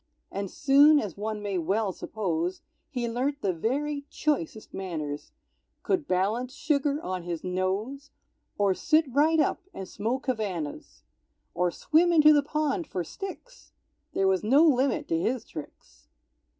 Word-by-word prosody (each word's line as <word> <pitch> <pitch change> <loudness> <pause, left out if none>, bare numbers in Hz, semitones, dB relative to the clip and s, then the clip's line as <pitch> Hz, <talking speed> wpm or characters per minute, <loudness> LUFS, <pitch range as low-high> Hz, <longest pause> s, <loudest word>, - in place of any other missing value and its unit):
And 200 -1 -3
soon, 290 +4 +5
as 205 - -4
one 210 0 -4
may 200 -3 -1
well 195 +5 0
suppose, 180 -3 -3 0.3
He 245 -5 -2
learnt 265 +5 -2
the 190 -2 +1
very 280 - -2
choicest 225 - -2
manners, 155 -6 -5 0.5
Could 355 -6 0
balance 220 +8 0
sugar 290 -1 0
on 185 0 -3
his 170 -1 -5
nose, 195 +10 -2 0.5
Or 200 -2 +3
sit 310 - +3
right 315 +4 +4
up 300 - +1
and 190 - -6
smoke 230 +8 -3
Havanas, 175 - -4 0.5
Or 180 0 +1
swim 330 - +2
into 305 -2 +7
the 295 - +5
pond 300 +2 -1
for 180 - -3
sticks, 390 - -9 0.4
There 195 - +2
was 190 0 +2
no 270 +9 +5
limit 280 +1 +2
to 165 - +1
his 235 +6 -1
tricks. - - -11
230 Hz, 145 wpm, -27 LUFS, 185-290 Hz, 0.5 s, into